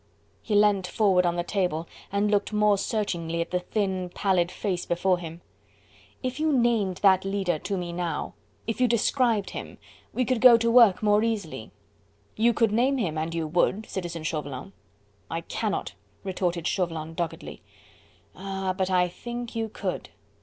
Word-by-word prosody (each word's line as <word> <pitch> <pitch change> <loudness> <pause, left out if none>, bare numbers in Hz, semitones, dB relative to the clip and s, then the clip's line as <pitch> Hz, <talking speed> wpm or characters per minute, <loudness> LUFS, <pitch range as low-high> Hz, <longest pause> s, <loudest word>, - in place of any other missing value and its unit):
He 215 - -2
leant 205 -3 +4
forward 185 -3 +3
on 170 - 0
the 175 - -1
table 175 -4 -1 0.2
and 205 +1 +1
looked 205 0 +1
more 210 -1 +3
searchingly 175 -6 -2
at 170 - -2
the 180 - +1
thin, 190 -1 -2
pallid 180 -1 +1
face 180 -2 -3
before 180 +1 +1
him. 170 0 -8 0.8
"If 255 +2 -3
you 315 0 +2
named 235 -8 +2
that 190 -2 +5
leader 195 -4 -1
to 200 +4 -3
me 175 -1 -4
now, 175 -1 -3 0.3
if 230 +2 -3
you 250 - +5
described 235 -2 +1
him, - - -7 0.3
we 255 - 0
could 250 -1 0
go 245 -2 +9
to 230 0 +1
work 230 -5 +6
more 210 0 +4
easily. 225 -3 -3 0.7
You 230 +2 +4
could 230 -1 +2
name 255 +5 +2
him, 180 -11 -1
and 160 +1 -2
you 165 -1 -1
would, 180 +6 +1
Citizen 170 -3 -5
Chauvelin." 145 -9 -4 0.6
"I 165 +2 -3
cannot," 205 +4 -3 0.3
retorted 180 -3 -2
Chauvelin 165 -4 -2
doggedly. 170 -1 -5 0.7
"Ah! 190 0 -3
but 190 -1 -1
I 180 -1 +3
think 240 +6 -7
you 225 -1 -2
could. - - -4
195 Hz, 165 wpm, -26 LUFS, 175-220 Hz, 0.8 s, go